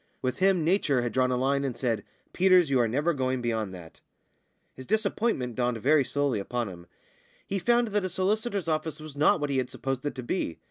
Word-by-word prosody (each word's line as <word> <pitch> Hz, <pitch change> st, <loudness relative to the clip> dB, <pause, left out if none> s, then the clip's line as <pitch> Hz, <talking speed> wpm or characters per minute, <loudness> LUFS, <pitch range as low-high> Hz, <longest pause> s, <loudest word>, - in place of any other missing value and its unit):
With 130 Hz, -1 st, -2 dB
him 190 Hz, -3 st, +3 dB
Nature 155 Hz, -8 st, +2 dB
had 120 Hz, -, -2 dB
drawn 130 Hz, -1 st, +2 dB
a 125 Hz, -, 0 dB
line, 140 Hz, +2 st, +1 dB
and 130 Hz, -4 st, -3 dB
said, 115 Hz, -4 st, -1 dB, 0.3 s
"Peters, 185 Hz, -4 st, +4 dB
you 130 Hz, -, +3 dB
are 120 Hz, -, +3 dB
never 145 Hz, +9 st, +1 dB
going 130 Hz, -2 st, -1 dB
beyond 110 Hz, -4 st, -2 dB
that." 85 Hz, -3 st, -13 dB, 0.7 s
His 130 Hz, -, -11 dB
disappointment 210 Hz, -, 0 dB
dawned 120 Hz, 0 st, 0 dB
very 140 Hz, +6 st, +3 dB
slowly 135 Hz, -2 st, -1 dB
upon 120 Hz, +2 st, -3 dB
him. 85 Hz, -2 st, -11 dB, 0.6 s
He 195 Hz, -, -2 dB
found 240 Hz, +3 st, +2 dB
that 210 Hz, -1 st, 0 dB
a -, -, -2 dB
solicitor's 200 Hz, +1 st, -1 dB
office 155 Hz, 0 st, -2 dB
was 155 Hz, -2 st, -10 dB
not 150 Hz, +3 st, +3 dB
what 145 Hz, -1 st, -2 dB
he 135 Hz, -, +1 dB
had 125 Hz, -, -2 dB
supposed 135 Hz, -1 st, -4 dB
it 145 Hz, -, -3 dB
to 130 Hz, -, -6 dB
be. 120 Hz, -, -2 dB
140 Hz, 215 wpm, -27 LUFS, 125-180 Hz, 0.7 s, Peters